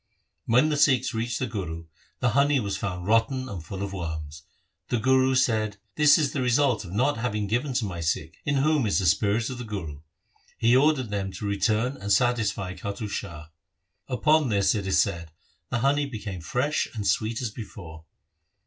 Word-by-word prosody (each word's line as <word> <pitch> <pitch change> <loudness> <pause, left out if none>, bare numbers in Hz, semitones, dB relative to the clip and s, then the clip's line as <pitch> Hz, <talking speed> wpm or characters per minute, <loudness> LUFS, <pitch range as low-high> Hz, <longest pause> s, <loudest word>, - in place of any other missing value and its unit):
When 125 +7 +4
the 150 - 0
Sikhs 130 -3 +3
reached 115 +1 -2
the 130 - -1
Guru, 85 -8 -5 0.4
the 125 - +3
honey 140 +3 +3
was 100 -4 -2
found'rotten 115 +8 0
and 95 -9 -6
full 95 +4 -6
of 100 0 -5
worms. 80 -4 -5 0.5
The 120 - 0
Guru 130 +2 +3
said, 110 -5 +1
' - - -46
This 150 -1 +6
is 150 -2 0
the 140 - -1
result 125 -2 +2
of 90 - -9
not 125 +7 +1
having 105 -3 -1
given 125 +7 -1
to 120 -3 0
my 90 -4 -5
Sikh 80 0 -2
in 140 - 0
whom 140 -2 +2
is 100 - +1
the 95 - 0
spirit 100 +7 +2
of 125 - -6
the - - -4
Guru.' 90 -10 -6 0.6
He 115 +2 +4
ordered 135 -4 +3
them 100 -1 -2
to 95 +3 -6
return 110 +6 0
and 100 +1 -4
satisfy 115 -6 +1
Kattu 100 +3 -5
Shah. 85 -6 -6 0.6
Upon 150 +2 +2
this, 100 -3 +2
it 100 -3 -3
is 95 -1 +2
said, 85 -2 -1 0.4
the 120 - -1
honey 140 +2 +2
became 105 -7 -6
fresh 135 - 0
and 105 -2 -4
sweet 110 +2 0
as 120 -4 -3
before. 85 -8 -10
110 Hz, 190 wpm, -26 LUFS, 95-130 Hz, 0.6 s, This